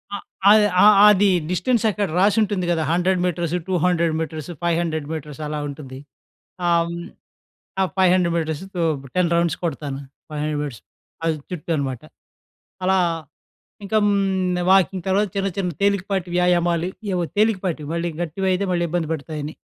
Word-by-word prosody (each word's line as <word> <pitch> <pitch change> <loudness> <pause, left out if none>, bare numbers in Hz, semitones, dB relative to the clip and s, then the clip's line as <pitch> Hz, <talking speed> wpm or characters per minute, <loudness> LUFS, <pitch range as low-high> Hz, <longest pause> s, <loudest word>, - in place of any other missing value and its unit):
ఆ - - -2 0.3
ఆహ్, 215 0 +7 0.2
ఆ - - +7 0.3
అది 205 0 +4 0.2
డిస్‌టెన్స్ 225 +5 +1
అక్కడ 205 -1 -1
రాసుంటుంది 205 -2 +2
గదా! 160 -2 +1
100 180 +2 +2
మీటర్స్, 170 -1 -1
200 175 -2 +1
మీటర్స్, 160 -1 -5
500 165 -3 -1
మీటర్స్ 150 -2 -6
అలా 150 0 -3
ఉంటుంది. 135 -2 -8 0.7
ఆహ్, 170 -1 +4
హ్మ్, 170 0 -6 0.7
ఆ - - +4
500 180 -2 +3
మీటర్స్, 160 +1 -2 0.5
10 180 -2 +2
రౌండ్స్ 170 -1 +1
కొడతాను. 145 -4 -3 0.3
500 150 -1 -2
మీటర్స్ 135 -6 -6 0.4
ఆ - - 0 0.2
చుట్టూ 170 -2 -6
అనమాట. 135 -4 -3 0.8
అలా 190 0 +3 0.9
ఇంక 220 - -8
హ్మ్. 190 -3 +1
వాకింగ్ 190 -1 +2
అనో 200 +2 +3
చిన్న 195 0 0
చిన్న 180 -3 -1
తేలికపాటి 195 -2 0
వ్యాయామాలు 175 -1 +2 0.3
ఏవో 175 -1 0
తేలికపాటివి 185 -8 0
మళ్ళీ 170 0 -1
గట్టివయితే 185 +3 -1
మళ్ళీ 175 -1 +1
ఇబ్బంది 165 -1 -2
పెడతాయని. 150 0 -5
175 Hz, 135 wpm, -22 LUFS, 160-190 Hz, 0.9 s, ఆహ్